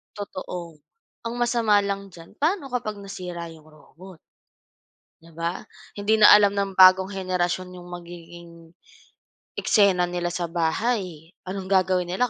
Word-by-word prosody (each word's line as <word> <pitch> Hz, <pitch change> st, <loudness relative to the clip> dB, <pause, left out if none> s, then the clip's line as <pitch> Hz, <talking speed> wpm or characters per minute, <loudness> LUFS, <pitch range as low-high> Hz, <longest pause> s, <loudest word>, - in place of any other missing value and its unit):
Totoo. 180 Hz, -5 st, -7 dB, 0.5 s
Ang 230 Hz, -, -3 dB
masama 235 Hz, -3 st, +2 dB
lang 200 Hz, 0 st, -3 dB
diyan, 175 Hz, +1 st, -16 dB
paano 310 Hz, -2 st, -1 dB
kapag 215 Hz, -4 st, -3 dB
nasira 180 Hz, -3 st, -7 dB
yung 160 Hz, -1 st, -16 dB
robot. 160 Hz, +4 st, -16 dB, 1.0 s
'Di 165 Hz, -, -17 dB
ba? 170 Hz, +2 st, -3 dB, 0.3 s
Hindi 210 Hz, +2 st, +1 dB
na 210 Hz, -, +8 dB
alam 205 Hz, -1 st, +5 dB
ng 200 Hz, -1 st, -1 dB
bagong 185 Hz, +1 st, +6 dB
henerasyon 185 Hz, -1 st, -2 dB
yung 175 Hz, 0 st, -12 dB
magiging, 170 Hz, -1 st, -11 dB, 1.1 s
eksena 195 Hz, -4 st, +3 dB
nila 175 Hz, 0 st, -3 dB
sa 175 Hz, 0 st, -3 dB
bahay, 170 Hz, 0 st, -2 dB
anong 190 Hz, +1 st, -6 dB
gagawin 185 Hz, -1 st, +1 dB
nila 190 Hz, +8 st, -1 dB
185 Hz, 130 wpm, -24 LUFS, 175-200 Hz, 1.1 s, na